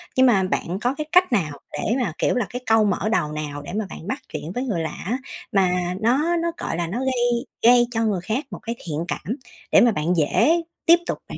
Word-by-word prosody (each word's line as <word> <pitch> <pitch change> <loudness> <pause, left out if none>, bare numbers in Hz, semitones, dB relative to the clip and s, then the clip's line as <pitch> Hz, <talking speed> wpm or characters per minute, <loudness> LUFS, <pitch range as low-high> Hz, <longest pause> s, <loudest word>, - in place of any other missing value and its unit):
nhưng 260 - +5
mà 205 -7 +4
bạn 185 0 -2
có 250 +3 0
cái 305 0 -4
cách 360 -5 +5
nào 155 -10 0
để 230 - -1
mà, 175 - -2
kiểu - - +1
là, 245 -4 +1
cái 245 +1 -5
câu 220 -1 +4
mở 205 +2 0
đầu 150 -9 +1
nào 150 -1 -5
để 145 - -8
mà 215 0 -1
bạn 165 - -9
bắt 260 +5 -2
chuyện 160 - -5
với 250 - -1
người 205 -11 -1
lạ 160 - -2 0.2
á, 240 +6 0 0.3
mà 180 -2 +1
nó 285 +10 +2
nó, 335 0 0
gọi - - -3
là, 170 -1 -1
nó 215 +9 -3
gây 245 -1 0 0.2
gây 240 +1 +6
cho 225 -1 0
người 195 -5 0
khác 225 - -2
một - - -6
cái 230 +1 -5
thiện 160 +1 -3
cảm, 220 +7 -3 0.4
để - - +7
mà 240 - +5
bạn 165 -2 0
dễ 320 - +3 0.2
tiếp 335 +1 +8
tục - - -2
bạn - - -6
220 Hz, 250 wpm, -23 LUFS, 175-250 Hz, 0.4 s, tiếp